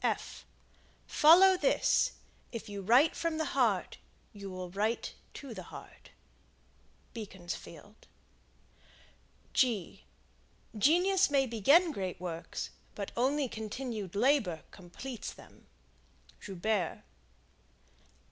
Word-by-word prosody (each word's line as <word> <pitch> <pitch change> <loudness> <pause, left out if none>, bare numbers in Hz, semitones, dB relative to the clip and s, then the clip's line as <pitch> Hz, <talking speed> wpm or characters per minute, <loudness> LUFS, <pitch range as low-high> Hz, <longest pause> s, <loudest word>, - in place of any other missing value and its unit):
Follow 365 +5 +7
this: - - +2 0.4
If 230 -1 -6
you 200 -1 -6
write 245 - +4
from 330 -1 -1
the 315 - 0
heart, 230 -8 +1 0.3
you 200 -1 -8
will 185 -1 -6
write 215 +5 -1 0.2
to 275 -4 -8
the 190 - -7
heart. - - -12 1.0
Beaconsfield 190 -2 -9 1.5
Genius 300 - 0
may 275 -2 +3
begin 280 - +4
great 190 - -4
works, 170 -2 -5 0.2
but 200 -2 -5
only 270 +3 +1
continued 220 -3 -5
labor 210 - +2
completes 205 +7 -8
them. - - -17 0.7
Joubert. 195 -2 -2
225 Hz, 90 wpm, -31 LUFS, 195-280 Hz, 1.5 s, Follow